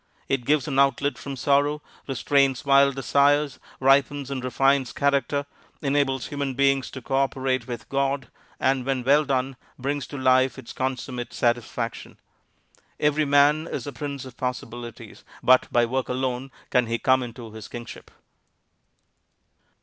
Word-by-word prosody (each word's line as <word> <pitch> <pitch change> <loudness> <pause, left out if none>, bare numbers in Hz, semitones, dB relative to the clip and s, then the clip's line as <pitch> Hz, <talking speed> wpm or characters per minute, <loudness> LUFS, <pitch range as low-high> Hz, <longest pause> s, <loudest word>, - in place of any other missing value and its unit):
It 135 -3 -1
gives 150 +1 +2
an 135 -2 0
outlet 140 +1 +2
from 140 -1 -6
sorrow, 145 +3 +2 0.3
restrains 135 0 +1
wild 140 0 +5
desires, 140 +2 +2 0.2
ripens 140 +1 +2
and 130 -2 -3
refines 135 +1 +2
character, 140 0 +1 0.4
enables 135 -2 0
human 140 -2 -3
beings 135 -1 +2
to 130 - -9
cooperate 135 -2 0
with 120 -2 -6
God, 135 -1 -1 0.3
and 130 -1 +1
when 130 -1 -1
well 145 +4 +4
done, 135 -1 -1 0.2
brings 140 +2 -3
to 145 - -7
life 130 0 +3
its 130 -3 -9
consummate 130 -2 -4
satisfaction. 120 -1 -2 0.8
Every 150 +1 +2
man 145 +3 +4
is - - -4
a 145 - -6
Prince 140 +1 -5
of 130 -2 -12
Possibilities, 120 -2 -6 0.2
but 130 0 +4
by 120 0 +4
work 130 +2 -2
alone 130 +1 -2 0.2
can 125 -2 +3
he 115 +1 0
come 130 +2 +3
into 120 -2 -8
his 110 -1 -9
Kingship. 120 -1 -9
135 Hz, 140 wpm, -25 LUFS, 125-140 Hz, 0.8 s, wild